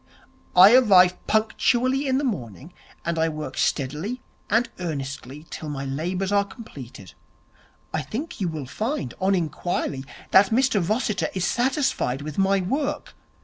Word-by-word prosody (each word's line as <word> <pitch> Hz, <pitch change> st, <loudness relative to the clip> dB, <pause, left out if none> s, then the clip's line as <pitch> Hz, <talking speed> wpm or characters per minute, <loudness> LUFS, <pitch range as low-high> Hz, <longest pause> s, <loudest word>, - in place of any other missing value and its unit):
I 190 Hz, +5 st, +9 dB
arrive 185 Hz, -8 st, +6 dB
punctually 250 Hz, +5 st, +1 dB
in 260 Hz, 0 st, +2 dB
the 285 Hz, -, 0 dB
morning, 145 Hz, -, -4 dB, 0.3 s
and 170 Hz, -1 st, -1 dB
I 160 Hz, 0 st, +2 dB
work 155 Hz, -1 st, -6 dB
steadily 150 Hz, -, -1 dB, 0.3 s
and 230 Hz, +3 st, +3 dB
earnestly 140 Hz, -3 st, -5 dB
till 155 Hz, -, -6 dB
my 140 Hz, -2 st, -4 dB
labours 180 Hz, +8 st, -2 dB
are 200 Hz, 0 st, +4 dB
completed. 140 Hz, -, -11 dB, 0.8 s
I 155 Hz, -, 0 dB
think 220 Hz, -, -6 dB
you 185 Hz, -, +1 dB
will 155 Hz, -4 st, -4 dB
find, 215 Hz, -, -3 dB
on 195 Hz, +1 st, +3 dB
inquiry, 155 Hz, -4 st, -2 dB, 0.3 s
that 190 Hz, +1 st, +6 dB
Mr 230 Hz, -3 st, +2 dB
Rossiter 215 Hz, -6 st, 0 dB
is 185 Hz, -2 st, 0 dB
satisfied 245 Hz, -, 0 dB
with 155 Hz, +3 st, -5 dB
my 195 Hz, 0 st, +3 dB
work.' 285 Hz, +9 st, -2 dB
185 Hz, 145 wpm, -24 LUFS, 150-230 Hz, 0.8 s, I